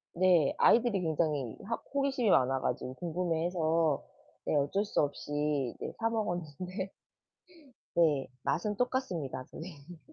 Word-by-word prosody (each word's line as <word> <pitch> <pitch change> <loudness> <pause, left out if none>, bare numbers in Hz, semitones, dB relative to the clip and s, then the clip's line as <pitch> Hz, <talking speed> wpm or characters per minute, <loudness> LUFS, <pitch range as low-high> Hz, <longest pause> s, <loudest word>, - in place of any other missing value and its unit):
네. 175 -5 +4
아이들이 235 -4 +5
굉장히 150 -6 0
하 230 +4 -1 0.2
호기심이 270 -5 +1
많아 130 -4 +4
가지고 130 +1 -2
궁금해해서 165 -2 0 0.4
네 - - +1
어쩔 145 +9 +1
수 210 - -1
없이 145 0 -3 0.5
네 - - -5
사 225 0 +2
먹었는데 185 -2 -3 1.0
네 155 -5 +3 0.2
맛은 205 +8 0
똑같습니다 180 - -1
선생님. 160 0 -10
170 Hz, 270 characters per minute, -31 LUFS, 145-195 Hz, 1.0 s, 아이들이